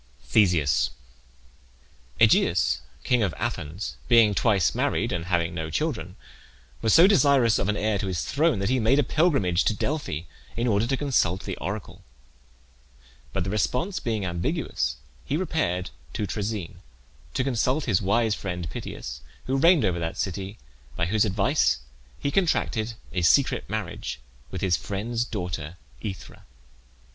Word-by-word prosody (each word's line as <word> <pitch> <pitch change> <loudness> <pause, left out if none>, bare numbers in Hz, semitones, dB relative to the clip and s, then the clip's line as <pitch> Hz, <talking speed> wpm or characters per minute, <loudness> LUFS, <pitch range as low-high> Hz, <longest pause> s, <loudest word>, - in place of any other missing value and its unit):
THESEUS. 85 - +3 1.3
Aegeus, - - +4 0.2
king 125 -2 +2
of 95 -6 0
Athens, 80 +7 -4
being 115 -3 +6
twice 100 -4 +2
married, - - 0
and 85 -1 -2
having 85 -1 0
no 80 -2 -4
children, 95 - -2 0.7
was 110 - +2
so 165 - +8
desirous 140 - +4
of 95 - 0
an 105 - 0
heir 105 -1 0
to 100 - -2
his 90 -3 -2
throne 155 -1 +2
that 100 +2 -1
he 130 0 +2
made 115 +5 +3
a 145 - +4
pilgrimage 135 - +2
to 110 - +2
Delphi 140 - -2 0.4
in 120 - 0
order 110 -1 +2
to 135 +1 0
consult 110 - +1
the - - -4
oracle. 100 +5 -6 1.3
But - - -1
the 95 - -3
response 125 - 0
being 110 -4 -2
ambiguous, 85 -7 -1 0.3
he 145 - -1
repaired 95 - -1 0.2
to 105 - -2
Troezen 100 -3 -4 0.6
to 130 - +1
consult 130 +3 0
his 105 -6 +2
wise 110 +3 +2
friend 90 -5 -4
Pittheus, 65 0 -6 0.2
who 130 - 0
reigned 165 - +5
over 90 -2 0
that 85 -1 -3
city, 95 +2 -3 0.4
by 85 - 0
whose 110 +4 +2
advice 105 +9 +2 0.4
he 140 - -2
contracted 120 - 0 0.2
a 90 - 0
secret 85 - +3
marriage - - -4 0.3
with 95 - -5
his 90 -4 +2
friend's 115 +4 -2
daughter 90 -7 -5 0.3
Aethra. 95 -2 -7
105 Hz, 150 wpm, -26 LUFS, 90-125 Hz, 1.3 s, so